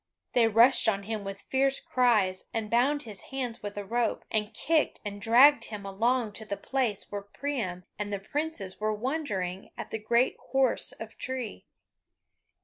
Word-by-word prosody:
They 235 -2 +5
rushed 230 +3 +6
on 200 -2 -1
him 215 0 -4
with 195 0 -6
fierce 270 0 +1
cries, 215 -7 +2
and 220 -2 -2
bound 275 +5 +3
his 210 -4 -7
hands 255 -4 -4
with 205 0 -6
a 205 - -4
rope, 235 +3 -1
and 215 -1 0
kicked 310 +7 +1
and 205 0 -5
dragged 255 +7 +6
him 210 -2 -7
along 225 +4 +1
to 220 - -7
the 200 -1 -3
place 250 -7 -2
where 205 -1 -3
Priam 200 -4 -4 0.2
and 205 0 -3
the 200 - 0
princes 225 -2 -3
were 215 0 0
wondering 210 - -3
at - - -7
the 220 - -2
great 235 +4 +2 0.2
horse 265 -2 +2
of 225 0 -10
tree. 255 -4 -5
225 Hz, 170 wpm, -29 LUFS, 205-260 Hz, 0.2 s, rushed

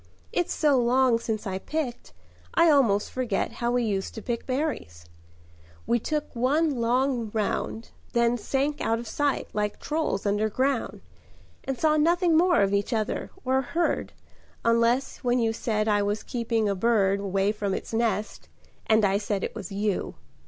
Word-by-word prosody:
It's 175 0 0
so 290 -4 +3
long 245 0 +3
since 220 -1 -3
I 190 -1 -3
picked 295 -1 -4 0.4
I 335 -1 +6
almost 230 -8 +3
forget 245 -6 -1
How 235 - -2
we 245 0 +1
used 195 -4 -2
to 220 - -6
pick 235 -2 -3
berries: 255 - -3 0.8
we 240 - +2
took 300 +3 -3
one 290 +6 +2
look 245 0 +1
round, 220 +1 -2 0.2
Then 235 0 +3
sank 275 +5 -1
out 225 - +1
of 235 0 -7
sight 290 +2 -1
like 210 0 -2
trolls 305 -11 -2
underground, 220 +6 0 0.6
And 270 -2 -3
saw 310 -1 +3
nothing 340 +2 +3
more 345 +2 +4
of 195 0 +1
each 200 +5 0
other, 215 -2 -2 0.2
or 260 +1 +2
heard, 335 +6 -1 0.5
Unless 230 +3 +2
when 245 -1 0
you 225 -2 +1
said 215 -1 -1
I 205 -1 +3
was 205 +1 -1
keeping 230 -2 -1
a 200 - +1
bird 200 -1 +2
Away 195 0 0
from 205 -2 -2
its - - -6
nest, 225 -2 -1 0.4
and 220 -1 +4
I 195 +1 +2
said 205 -2 -2
it - - -3
was 195 - -7
you. 200 0 -2
230 Hz, 165 wpm, -26 LUFS, 210-265 Hz, 0.8 s, I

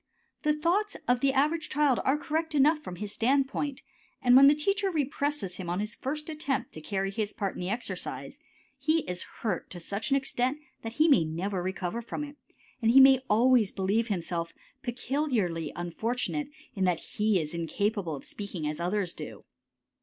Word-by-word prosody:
The 300 -2 +2
thoughts 365 +7 +1
of 245 0 +3
the 275 +1 +3
average 305 +4 +1
child 290 -3 +3
are 270 +3 +3
correct 320 +1 -2
enough 300 +3 +5
from 185 -12 -7
his 205 +2 -5
standpoint, 275 +2 0 0.4
and 250 -2 +5
when 275 +1 +9
the 290 - +6
teacher 395 +6 +1
represses 285 - -1
him 180 -3 -5
on 175 +2 -1
his 210 +2 -3
first 300 +3 -4
attempt 285 -5 -2
to 155 - -8
carry 195 +4 -2
his 210 +1 -2
part 195 -2 -2
in - - -7
the 180 - -2
exercise, 235 +4 -4 0.4
he 310 +4 +2
is 180 -8 -4 0.2
hurt 200 -7 -2
to 175 - -8
such 200 +5 -3
an 275 - +4
extent 260 0 0 0.2
that 225 0 -6
he 310 +5 +4
may 275 - +6
never 180 +4 -2
recover 190 +4 -3
from 235 +5 -5
it, 290 0 -8 0.5
and 225 - +3
he 255 +4 +8
may 265 -1 +8
always 230 -1 +4
believe 205 +4 0
himself 170 -4 -2 0.3
peculiarly 240 - -1
unfortunate 230 - -2 0.3
in 195 -5 -1
that 180 -2 +2 0.2
he 210 -2 +3
is 155 -1 -4
incapable 175 +1 -1
of 140 - -9
speaking 200 -6 -5
as 150 +1 -3
others 180 +1 -1
do. - - -8
235 Hz, 185 wpm, -29 LUFS, 190-285 Hz, 0.5 s, when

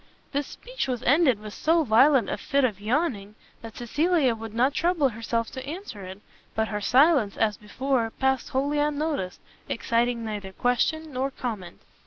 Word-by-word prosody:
This 285 -1 -1
speech - - -5
was 250 -2 -3
ended 270 -4 +4
with 210 -1 -9
so 325 +1 +2
violent 260 +2 +5
a - - -1
fit 280 -1 0
of 210 -6 0
yawning, 215 -4 -1 0.3
that 225 -1 -10
Cecilia 290 +2 +2
would 225 -1 -7
not 255 +4 +3
trouble 335 -4 +2
herself 230 0 -2
to 260 - -6
answer 290 - -7
it: 190 +1 -9 0.4
but 220 0 0
her 210 -1 -3
silence, 260 - +4
as 215 -2 +2
before, 235 +3 -1
passed 265 +2 0
wholly 285 +3 0
unnoticed, 295 - -1 0.3
exciting 235 0 0
neither 205 -3 -5
question 290 - 0
nor 260 +2 -1
comment. 215 -10 -6
250 Hz, 165 wpm, -26 LUFS, 220-290 Hz, 0.4 s, violent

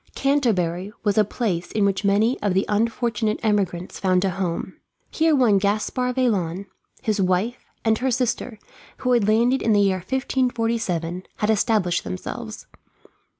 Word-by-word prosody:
Canterbury 205 -10 0
was 205 -2 +1
a - - +6
place 195 -5 -3
in 210 -2 +1
which 195 0 0
many 210 +5 +2
of 205 -3 0
the 195 - +2
unfortunate 220 0 0
emigrants 195 -5 -1
found 185 0 +2
a 190 - +1
home. 180 -2 -3 0.3
Here 320 -1 +3
one 230 -7 +4
Gaspard 215 +5 -1
Vaillant, 200 -8 0 0.4
his 215 -4 0
wife, 190 +6 0 0.2
and 220 -1 +2
her 265 - 0
sister, 250 -2 -1 0.4
who 250 - -1
had 235 -4 +3
landed 235 +5 +3
in 225 - +2
the 205 - +4
year 195 -2 +3
1547, 225 -6 -1
had 210 +1 +1
established 210 -5 +1
themselves. 90 - -6
210 Hz, 150 wpm, -23 LUFS, 190-235 Hz, 0.4 s, a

